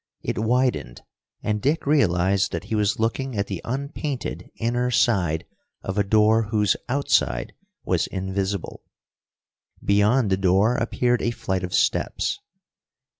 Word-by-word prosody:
It -, -, -2 dB
widened, 115 Hz, -, 0 dB, 0.4 s
and 105 Hz, -1 st, -1 dB
Dick 150 Hz, +7 st, 0 dB
realized 95 Hz, -, +2 dB
that -, -, -3 dB
he -, -, -6 dB
was 105 Hz, -1 st, +1 dB
looking 115 Hz, +2 st, -1 dB
at 100 Hz, -, +1 dB
the 95 Hz, -4 st, -5 dB
unpainted 140 Hz, +1 st, -4 dB
inner 120 Hz, +2 st, 0 dB
side 90 Hz, -10 st, +1 dB, 0.4 s
of 95 Hz, -, -3 dB
a 105 Hz, -, +2 dB
door 110 Hz, +2 st, +3 dB
whose 105 Hz, -3 st, +2 dB
outside 125 Hz, -, +1 dB, 0.3 s
was -, -, +1 dB
invisible. 95 Hz, 0 st, -3 dB, 1.0 s
Beyond 105 Hz, +3 st, +3 dB
the 95 Hz, -, +3 dB
door 95 Hz, +4 st, +3 dB
appeared 120 Hz, 0 st, +1 dB
a -, -, +1 dB
flight 95 Hz, -5 st, -2 dB
of 90 Hz, 0 st, -2 dB
steps. -, -, 0 dB
105 Hz, 130 wpm, -24 LUFS, 95-120 Hz, 1.0 s, door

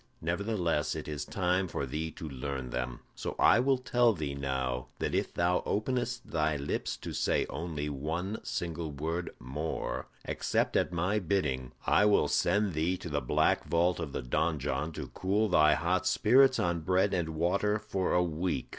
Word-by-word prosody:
Nevertheless, 85 Hz, -4 st, 0 dB
it 80 Hz, -, -5 dB
is 75 Hz, -1 st, -4 dB
time 90 Hz, 0 st, 0 dB
for 70 Hz, -, -3 dB
thee 75 Hz, +5 st, -3 dB
to 80 Hz, -, -8 dB
learn 65 Hz, -2 st, -4 dB
them. 60 Hz, 0 st, -3 dB
So -, -, -5 dB
I -, -, +6 dB
will 135 Hz, +1 st, +3 dB
tell 120 Hz, -2 st, +3 dB
thee 75 Hz, -6 st, -3 dB
now 65 Hz, -2 st, -2 dB
that -, -, -2 dB
if -, -, 0 dB
thou 90 Hz, +1 st, +1 dB
openest 120 Hz, +2 st, -2 dB
thy 80 Hz, -2 st, +1 dB
lips 70 Hz, +1 st, -2 dB
to -, -, -7 dB
say -, -, +1 dB
only 75 Hz, -2 st, -3 dB
one 80 Hz, +9 st, -3 dB
single 85 Hz, -2 st, -3 dB
word 80 Hz, +5 st, -3 dB
more 65 Hz, 0 st, -4 dB, 0.2 s
except -, -, 0 dB
at -, -, +2 dB
my 90 Hz, +5 st, +1 dB
bidding, 75 Hz, -9 st, -1 dB
I 105 Hz, -, +4 dB
will 105 Hz, -1 st, +4 dB
send 105 Hz, -2 st, +2 dB
thee 80 Hz, +4 st, 0 dB
to 85 Hz, -, -7 dB
the 75 Hz, -1 st, -1 dB
black 60 Hz, -, +2 dB
vault 85 Hz, +1 st, +2 dB
of 80 Hz, -4 st, -4 dB
the -, -, -4 dB
donjon 75 Hz, +3 st, -1 dB
to -, -, -6 dB
cool 100 Hz, +4 st, 0 dB
thy 75 Hz, -3 st, +5 dB
hot 90 Hz, +2 st, 0 dB
spirits 130 Hz, +7 st, +5 dB
on 85 Hz, -1 st, 0 dB
bread 95 Hz, +4 st, +2 dB
and 80 Hz, -3 st, -1 dB
water 100 Hz, +6 st, +1 dB
for 95 Hz, -3 st, -2 dB
a 90 Hz, -, +4 dB
week." 85 Hz, -4 st, -2 dB
85 Hz, 175 wpm, -30 LUFS, 75-95 Hz, 0.2 s, I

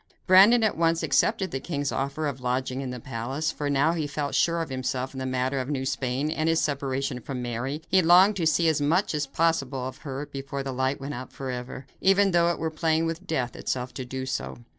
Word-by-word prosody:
Brandon 200 Hz, +6 st, +7 dB
at 215 Hz, -, +2 dB
once 165 Hz, 0 st, +1 dB
accepted 195 Hz, -5 st, +1 dB
the 135 Hz, -, -2 dB
king's 145 Hz, -2 st, -3 dB
offer 140 Hz, +3 st, -2 dB
of 135 Hz, -3 st, -3 dB
lodging 130 Hz, +1 st, -1 dB
in 135 Hz, -, -4 dB
the 125 Hz, 0 st, -5 dB
palace, 130 Hz, +7 st, -3 dB
for 145 Hz, -2 st, -3 dB
now 140 Hz, +3 st, +3 dB
that 170 Hz, -, -3 dB
he 150 Hz, -, -1 dB
felt 145 Hz, 0 st, -3 dB
sure 170 Hz, 0 st, +2 dB
of 165 Hz, -, -3 dB
himself 130 Hz, 0 st, -3 dB
in 130 Hz, -, -6 dB
the 130 Hz, -, -3 dB
matter 130 Hz, +1 st, -1 dB
of 130 Hz, +1 st, -4 dB
New 135 Hz, -3 st, -2 dB
Spain, 130 Hz, +3 st, -1 dB
and 160 Hz, 0 st, 0 dB
his 165 Hz, 0 st, +3 dB
separation 135 Hz, -2 st, -1 dB
from 125 Hz, 0 st, -5 dB
Mary, 125 Hz, +6 st, -3 dB
he 190 Hz, 0 st, +4 dB
longed 180 Hz, +5 st, +6 dB
to 165 Hz, -3 st, +1 dB
see 165 Hz, +2 st, +3 dB
as 155 Hz, -2 st, +2 dB
much 175 Hz, +7 st, +2 dB
as 150 Hz, -2 st, -1 dB
possible 135 Hz, -4 st, 0 dB
of 130 Hz, -, -8 dB
her 140 Hz, -1 st, -5 dB
before 140 Hz, 0 st, -5 dB
the 135 Hz, -1 st, -4 dB
light 130 Hz, +2 st, 0 dB
went 140 Hz, +2 st, -5 dB
out 130 Hz, 0 st, -7 dB
forever, 130 Hz, 0 st, -6 dB, 0.2 s
even 195 Hz, +1 st, +4 dB
though 170 Hz, -1 st, +4 dB
it 175 Hz, -, -1 dB
were 160 Hz, 0 st, -2 dB
playing 160 Hz, +1 st, +1 dB
with 165 Hz, +3 st, -4 dB
death 125 Hz, -8 st, -2 dB
itself 125 Hz, -1 st, -3 dB
to 130 Hz, -, -5 dB
do 130 Hz, +1 st, -5 dB
so. 65 Hz, -, -4 dB
140 Hz, 235 wpm, -26 LUFS, 130-165 Hz, 0.2 s, Brandon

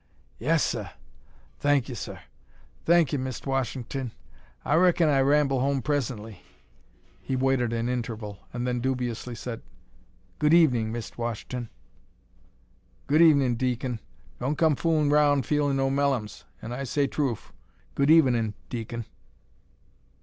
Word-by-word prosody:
"Yes, 155 Hz, +6 st, +2 dB
seh; 105 Hz, -5 st, -2 dB, 0.7 s
thank 145 Hz, -3 st, +2 dB
'e, 130 Hz, -, -5 dB
seh; 110 Hz, -, -6 dB, 0.7 s
thank 170 Hz, -4 st, +4 dB
'e, -, -, +2 dB
Mist' 130 Hz, -1 st, -5 dB
Wash'ton. 135 Hz, -1 st, -2 dB, 0.6 s
I -, -, +1 dB
raikon 175 Hz, 0 st, +4 dB
I 140 Hz, -2 st, +3 dB
ramble 140 Hz, -1 st, +3 dB
home 135 Hz, 0 st, 0 dB
pressenly." 115 Hz, -9 st, -3 dB, 0.8 s
He 135 Hz, -, -3 dB
waited 130 Hz, -2 st, +1 dB
an 115 Hz, 0 st, -1 dB
interval, 115 Hz, -5 st, -4 dB
and 120 Hz, 0 st, -3 dB
then 125 Hz, -1 st, -1 dB
dubiously 125 Hz, -1 st, -2 dB
said, 115 Hz, 0 st, -6 dB, 0.8 s
"Good 150 Hz, +2 st, +4 dB
evenin', 125 Hz, -10 st, +4 dB
Mist' 120 Hz, +1 st, -6 dB
Wash'ton." 120 Hz, +1 st, -4 dB, 1.4 s
"Good 150 Hz, +3 st, +3 dB
evenin', 140 Hz, -6 st, +5 dB
deacon. 125 Hz, -1 st, -2 dB, 0.4 s
Don' 135 Hz, +5 st, -1 dB
come 155 Hz, 0 st, +3 dB
foolin' 155 Hz, -1 st, +1 dB
roun' 145 Hz, -2 st, +4 dB
feelin' 145 Hz, -2 st, +1 dB
no 135 Hz, 0 st, +1 dB
mellums, 135 Hz, -6 st, -1 dB, 0.2 s
and 115 Hz, -, -5 dB
I 135 Hz, +3 st, -4 dB
say 140 Hz, +2 st, 0 dB
troof. 135 Hz, -5 st, -3 dB, 0.4 s
Good 140 Hz, +1 st, +1 dB
evenin', 120 Hz, -9 st, +4 dB, 0.2 s
deacon." 115 Hz, -1 st, -5 dB
130 Hz, 130 wpm, -26 LUFS, 120-145 Hz, 1.4 s, evenin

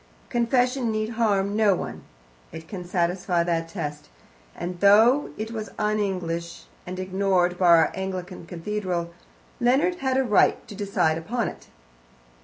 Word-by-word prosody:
Confession 245 Hz, 0 st, +1 dB
need 215 Hz, 0 st, -1 dB
harm 205 Hz, -4 st, +1 dB
no 210 Hz, -3 st, +4 dB
one -, -, -6 dB, 0.5 s
it 160 Hz, 0 st, -9 dB
can 185 Hz, -2 st, -6 dB
satisfy 175 Hz, 0 st, 0 dB
that 165 Hz, -1 st, -1 dB
test 150 Hz, -, -6 dB, 0.5 s
and 175 Hz, 0 st, -5 dB
though 220 Hz, +8 st, +5 dB
it 220 Hz, +1 st, -4 dB
was 215 Hz, -3 st, -5 dB
un 215 Hz, 0 st, 0 dB
English, 170 Hz, -4 st, -3 dB, 0.2 s
and 180 Hz, +1 st, -5 dB
ignored 185 Hz, -1 st, +1 dB
by 180 Hz, -, +3 dB
our 165 Hz, -2 st, +6 dB
Anglican 185 Hz, -2 st, -5 dB
cathedral, 175 Hz, -1 st, -3 dB, 0.5 s
Leonard 285 Hz, +9 st, +2 dB
had 265 Hz, -4 st, 0 dB
a 265 Hz, -, +3 dB
right 210 Hz, -5 st, +3 dB
to 215 Hz, -, -9 dB
decide 195 Hz, -6 st, 0 dB
upon 235 Hz, +8 st, -2 dB
it. -, -, -13 dB
195 Hz, 145 wpm, -25 LUFS, 175-220 Hz, 0.5 s, our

